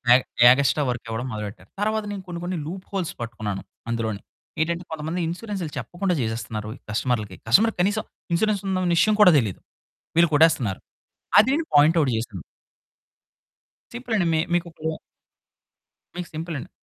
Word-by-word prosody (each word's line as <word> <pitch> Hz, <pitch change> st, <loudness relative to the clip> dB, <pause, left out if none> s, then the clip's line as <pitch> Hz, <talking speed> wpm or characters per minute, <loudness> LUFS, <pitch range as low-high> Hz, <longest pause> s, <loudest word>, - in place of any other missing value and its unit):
Egg 130 Hz, -, +2 dB, 0.3 s
extra 140 Hz, +3 st, +3 dB
work 120 Hz, -1 st, -3 dB
ఇవ్వడం 115 Hz, +3 st, -3 dB
మొదలుపెట్టారు. 105 Hz, -2 st, -7 dB
తర్వాత 215 Hz, +1 st, 0 dB
నేను 195 Hz, -2 st, -6 dB
కొన్ని, 170 Hz, -1 st, -5 dB
కొన్ని 180 Hz, 0 st, -2 dB
లూప్ 185 Hz, +3 st, -6 dB
హోల్స్ 175 Hz, -3 st, -2 dB
పట్టుకున్నాను 110 Hz, -4 st, -4 dB, 0.3 s
అందులోనే. 110 Hz, -3 st, -2 dB, 0.4 s
ఏంటంటే, 170 Hz, +2 st, -1 dB
కొంతమంది 160 Hz, +3 st, -3 dB
ఇన్సూరెన్స్‌లు 185 Hz, -3 st, -4 dB
చెప్పకుండా 180 Hz, 0 st, -2 dB
చేసేస్తున్నారు 110 Hz, -1 st, -3 dB, 0.2 s
కస్టమర్లకి. 105 Hz, -4 st, -1 dB
కస్టమర్‌కి 220 Hz, -, +5 dB
కనీసం 210 Hz, +3 st, 0 dB, 0.3 s
ఇన్సూరెన్స్ 205 Hz, +2 st, +1 dB
ఉందన 185 Hz, -1 st, 0 dB
విషయం 215 Hz, +5 st, +4 dB
కూడా 180 Hz, -5 st, +8 dB
తెలీదు. 105 Hz, -7 st, -3 dB, 0.6 s
వీళ్ళు 170 Hz, -1 st, +6 dB
కొట్టేస్తున్నారు. 135 Hz, -11 st, +3 dB, 0.6 s
అది 220 Hz, -, +7 dB
నేను 320 Hz, +1 st, -1 dB
పాయింట్ 150 Hz, +3 st, +6 dB
అవుట్ 140 Hz, -5 st, +2 dB
చేశాను. 110 Hz, -7 st, -5 dB, 1.5 s
సింపులండి 225 Hz, -7 st, -1 dB
మీ 160 Hz, -, +3 dB
మికిప్పుడు 165 Hz, -2 st, -2 dB, 1.2 s
మీకు 180 Hz, -1 st, -5 dB
సింపులండి. 160 Hz, -3 st, -5 dB
160 Hz, 135 wpm, -24 LUFS, 115-185 Hz, 1.5 s, కూడా